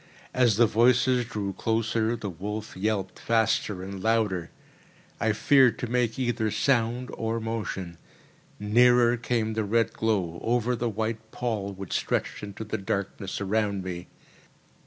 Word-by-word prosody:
As 125 -4 +4
the 120 - +6
voices 125 +2 +3
drew 105 -4 -4
closer, 115 +1 0
the 110 -3 -5
wolf 105 +5 -6
yelped 95 0 -2
faster 110 -4 +1
and 95 0 -6
louder. 105 -6 +1 0.7
I 110 -1 +2
feared 130 +3 +4
to - - -3
make 120 -1 0
either 120 -4 0
sound 125 +1 +1
or 115 0 -2
motion. 105 -6 -4 0.6
Nearer 120 +3 +5
came 115 -2 -1
the 110 0 0
red 115 +3 +1
glow, 95 -7 -1
over 120 +1 +1
the 120 0 -1
white 110 +1 -3
pall 110 -5 -3
which 95 -1 -7
stretched - - -1
into 105 +1 -7
the 110 0 -4
darkness 100 0 -3
around 100 -1 0
me. 90 -1 -6
110 Hz, 140 wpm, -27 LUFS, 100-120 Hz, 0.7 s, the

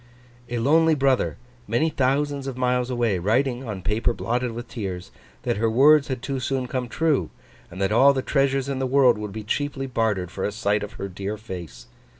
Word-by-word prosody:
A 120 - -2
lonely 160 +6 +4
brother, 135 -2 +1 0.3
many 120 +10 +1
thousands 140 +1 0
of 130 -2 -5
miles 125 0 +1
away, 120 -6 0
writing, 125 +7 +1
on 95 -3 -5
paper 110 +4 +1
blotted 120 +1 -2
with 120 +1 -7
tears, 95 -7 -6 0.3
that - - -1
her 115 +1 +1
words 140 +5 +5
had 130 -3 -4
too 135 -2 -2
soon 130 0 -1
come 125 0 -3
true, 160 -1 +1 0.4
and 90 - -10
that 95 +1 +1
all 130 +6 +6
the 135 -2 -2
treasures 135 -1 +1
in 135 -1 -2
the 130 - 0
world 130 -4 +4
would 105 -1 -5
be 110 +2 -6
cheaply 135 +5 -2
bartered 110 -8 -1
for 95 - -5
a - - 0
sight 105 0 0
of 105 +1 -6
her 100 -2 -5
dear 100 +3 -5
face? 85 - -8
120 Hz, 200 wpm, -24 LUFS, 105-135 Hz, 0.4 s, all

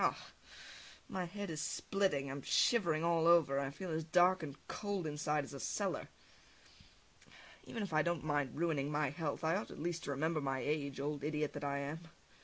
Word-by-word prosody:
Ugh! - - +3 0.9
My 185 -2 -2
head 200 +1 -5
is 155 -1 -3
splitting, 190 -10 0
I - - -4
am 140 +1 -5
shivering 170 - +3
all 170 -1 +3
over, 160 -5 +5
and 140 - -1
I - - -3
feel 165 +6 -6
as 160 0 -1
dark 180 +3 +4
and 145 -3 -6
cold 205 -4 -2
inside 150 0 0
as 140 - -9
a 140 - -6
cellar! 200 +6 -2 1.6
Even 225 - -4
if 195 - -5
I 155 - +5
don't 170 0 0
mind 145 -5 0
ruining 155 -4 +1
my 150 -2 +1
health, 155 -1 -3
I 160 +2 +3
ought 205 - -2
at - - -9
least 170 +1 -2
to - - -5
remember 155 +3 0
my 135 -1 0
age, 140 0 -1
old 145 0 -2
idiot 150 0 -1
that 145 - -5
I 140 0 0
am! 140 +3 -3
155 Hz, 205 wpm, -36 LUFS, 145-170 Hz, 1.6 s, over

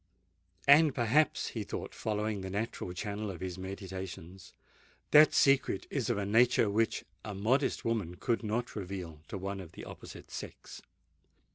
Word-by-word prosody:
And 145 0 +7
perhaps," 130 +6 +2
he - - -4
thought, - - -6
following 105 -1 -2
the 95 - -5
natural 100 -2 -3
channel 105 +3 -4
of 90 -4 -6
his 95 0 -5
meditations, 95 -2 -7 0.6
"that 155 +1 +8
secret 135 -8 +3
is 130 -5 -1
of 120 - +1
a 100 - -1
nature 115 0 +4
which 110 +2 +1 0.2
a 105 -2 -5
modest 125 +8 +1
woman 105 -7 -1
could 115 +5 0
not 115 +2 -2
reveal 90 -6 -5
to - - -5
one 100 +1 -4
of 90 -4 -10
the - - -9
opposite - - -10
sex?" - - -8
105 Hz, 155 wpm, -32 LUFS, 95-115 Hz, 0.6 s, that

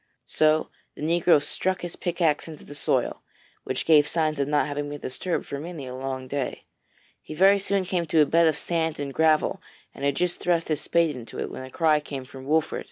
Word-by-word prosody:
So 155 0 +2 0.3
the - - -8
negro 170 0 +4
struck 185 +5 -2
his 175 -1 -6
pickaxe 170 -4 0
into 155 -2 -10
the - - -10
soil, 145 - 0 0.4
which - - -3
gave 150 -2 +6
signs 155 -3 0
of 140 - +1
not 150 0 +2
having 145 0 -3
been 145 0 -6
disturbed 170 +8 -3
for 140 - -5
many 160 -2 -7
a 125 - -7
long 130 0 -5
day. 135 -1 -3 0.6
He 155 - -9
very 195 +4 +5
soon 195 -1 0
came 175 -2 -1
to 155 0 +4
a - - +6
bed 165 +3 +4
of 155 -2 +2
sand 160 -2 -1
and 140 -1 -4
gravel, 160 0 +2 0.3
and 140 - -10
had 140 -1 +1
just 180 +2 -1
thrust 170 -2 0
his 155 - 0
spade 165 -3 +1
into 120 -2 -9
it, - - -3
when - - -7
a 130 - -9
cry 155 +2 +3
came 140 -3 -7
from 135 0 -11
Wolfert. 160 +1 +1
155 Hz, 220 wpm, -25 LUFS, 145-170 Hz, 0.6 s, gave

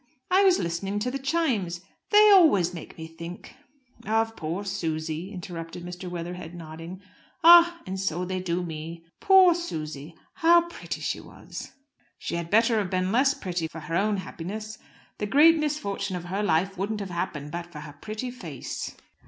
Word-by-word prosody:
I 375 +2 +6
was 375 -2 +5
listening 180 +4 -2
to 235 +5 -1
the 275 - -3
chimes. 255 - 0 0.3
They 420 0 +7
always 285 - +6
make 165 - -9
me 160 - -7
think 170 +2 -9 0.2
" 260 - -42 0.2
"Of 225 +1 +1
poor 170 +5 -4
Susy," 160 0 -3
interrupted 175 -2 -7
Mr. 180 +1 -7
Weatherhead, 175 0 -6
nodding. 165 +3 -9 0.4
"Ah! 345 0 +8
And 190 +1 -4
so 180 -1 -1
they 185 +1 -3
do 180 -1 -2
me. 165 0 -7
Poor 380 -2 +7
Susy! 155 - -5 0.2
How 340 0 +5
pretty - - -6
she - - -2
was!" - - -10 0.4
"She - - -5
had 170 -1 -3
better 225 +2 +4
have 195 -3 -2
been 185 0 0
less 270 +5 +3
pretty 175 -4 -3
for 160 0 -9
her 165 - -4
own 205 +2 +2
happiness. 215 +4 -6 0.4
The 210 - -1
great 315 +7 +6
misfortune 200 -11 -2
of 175 -1 -5
her 190 +4 -2
life 190 0 +1
wouldn't 210 +2 -2
have 195 -2 -5
happened 160 -4 -4
but 170 +1 -6
for 150 -3 -8
her 150 -1 -9
pretty 215 - -6
face." 165 - -6
185 Hz, 175 wpm, -26 LUFS, 170-230 Hz, 0.4 s, Ah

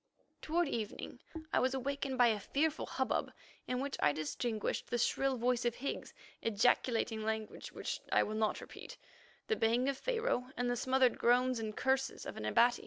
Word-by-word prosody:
Toward 340 +2 +1
evening 225 -6 -4 0.3
I - - +5
was 260 +1 +2
awakened 270 0 -2
by 245 -2 +6
a 215 -2 +1
fearful 305 +9 0
hubbub, 265 -1 -1 0.4
in 250 0 -1
which 275 +1 -3
I 145 - +4
distinguished 175 +9 -2
the 240 - -1
shrill 265 +2 +1
voice 245 +1 +1
of 240 -1 +1
Higgs 275 - -4 0.3
ejaculating 230 0 +2
language 220 0 -3
which - - -4
I - - +5
will 215 - -3
not 215 -1 0
repeat, - - -10 0.5
the 440 - +1
baying 235 - +2
of 275 - -1
Pharaoh, 460 - 0
and 245 0 +1
the - - +1
smothered 260 +1 +2
groans 250 +1 +3
and 215 -1 -4
curses 265 0 0
of - - -6
an 105 - -5
Abati. 240 - +4
245 Hz, 175 wpm, -34 LUFS, 225-265 Hz, 0.5 s, by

